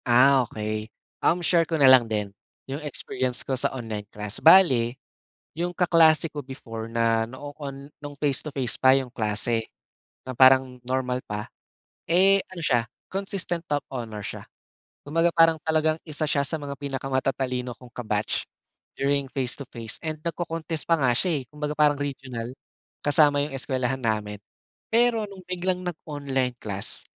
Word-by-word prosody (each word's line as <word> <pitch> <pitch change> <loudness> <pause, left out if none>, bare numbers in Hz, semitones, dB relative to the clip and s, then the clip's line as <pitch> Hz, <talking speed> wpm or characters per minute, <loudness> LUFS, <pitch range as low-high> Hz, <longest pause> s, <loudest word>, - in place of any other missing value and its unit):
Ah 125 +1 +5
okey. 110 0 -4 0.3
Um, 175 0 +2
share 170 -1 +3
ko 165 - 0
na 140 - +5
lang 130 -3 +7
din, 105 -2 -2 0.3
yung 140 +3 -5
experience 130 -3 -2
ko 135 - -2
sa 130 - +1
online 110 -5 -6
class 105 0 -5
bale, 135 -9 +6 0.6
yung 175 +2 -3
kaklase 165 -3 +5
ko 145 - -4
before 115 -4 -8
na 115 -1 +1
noon 140 +1 -8
nung 145 -1 -8
face 140 -2 0
to 150 - -6
face 135 -4 -1
pa 130 +1 +6
yung 130 -2 -4
klase. 110 0 -1 0.5
Na 130 -2 -8
parang 130 -1 +6
normal 125 0 -2
pa, 105 +1 -5 0.6
eh, 195 +3 +5
ano 185 - -10
siya, 135 -8 +2 0.2
consistent 195 -3 -3
top 145 -1 -1
honor 115 -4 -5
siya. - - -6 0.6
Kumbaga 165 +3 +1
parang 165 -1 +5
talagang 155 0 +2
isa 155 -1 -2
siya 140 -1 +1
sa 155 +2 -2
mga 140 -1 -6
pinaka-matatalino 130 -2 -2
kong 125 +1 -15
ka-batch, 110 -3 -2 0.5
during 140 0 0
face 130 -3 0
to 140 - -7
face 115 -2 -3
and 155 -1 -4
nag-co-contest 165 -1 -4
pa 165 -1 +2
nga 130 - +4
siya 165 -4 +1
eh, - - -10
kumbaga 150 0 -4
parang 150 -1 +3
regional, 130 -4 -5 0.5
kasama 145 0 +4
yung 145 -1 -3
eskwelahan 130 -1 -1
namin. 105 -3 -1 0.6
Pero 230 -2 +3
nung 200 -2 -11
biglang 180 0 -1
nag-online 145 -7 -3
class, 100 -2 -3
135 Hz, 155 wpm, -25 LUFS, 125-155 Hz, 0.6 s, lang